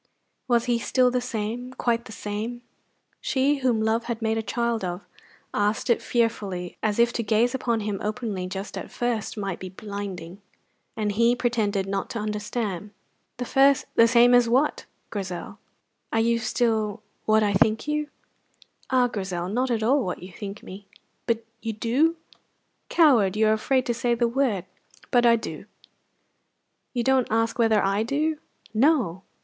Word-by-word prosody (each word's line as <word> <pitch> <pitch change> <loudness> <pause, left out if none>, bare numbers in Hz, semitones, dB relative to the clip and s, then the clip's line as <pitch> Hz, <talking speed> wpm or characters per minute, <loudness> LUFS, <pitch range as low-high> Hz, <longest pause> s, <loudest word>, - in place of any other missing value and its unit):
Was 240 -1 +2
he 240 -2 +1
still 250 +1 +2
the 250 0 0
same, 240 +1 -4
quite 235 -2 0
the - - -10
same? 220 +4 -5 0.6
She, 280 +2 +1
whom 255 -4 +1
love 225 +1 +1
had 235 -2 -3
made 225 -1 0
a - - 0
child 235 -1 -1
of, 180 +1 -4 0.5
asked 210 +4 +1
it 235 - +2
fearfully, 205 -7 -1
as 215 -2 0
if 235 +1 +3
to - - -1
gaze 225 +3 +2
upon 235 -4 0
him 205 -2 -3
openly 210 -4 -3
just 190 +2 -5
at - - -8
first 240 -3 -2
might 195 -4 -3
be 185 - -6
blinding; 195 -2 -7 0.6
and 210 -1 0
he 230 +3 +3
pretended 220 -5 0
not 195 0 -3
to 230 - -4
understand. 210 -2 -3 0.5
"The 270 +3 +3 0.2
same 240 +1 +6
as 245 -1 +5
what, 265 +5 +1 0.2
Grizel?" 190 -4 -5 0.5
"Are 225 - +1
you 230 +1 +2
still 220 -2 0 0.2
what 215 0 +4
I 205 -1 +1
think 215 +6 +2
you?" 300 0 -1 0.8
"Ah, 255 -1 +4
Grizel, 190 -6 -3
not 250 +5 0
at 225 -2 0
all 265 +4 +3
what 180 -2 -4
you 185 - -9
think 200 +3 -7
me." 195 +1 -10 0.4
"But 230 -1 0 0.2
you 225 -1 -3
do?" 255 +10 +2 0.7
"Coward! 235 - +4
You 215 0 +4
are - - +5
afraid 255 +4 +1
to 240 - 0
say 235 +1 0
the 235 0 +2
word. 235 -7 0 0.5
But 240 -1 +5
I 235 - +6
do!" 230 - -6 1.3
"You 240 -2 -1
don't 265 0 +3
ask 225 +2 0
whether 220 -3 +4
I 195 +2 +1
do!" 295 +6 0 0.3
"No." 225 - +2
225 Hz, 165 wpm, -25 LUFS, 205-245 Hz, 1.3 s, same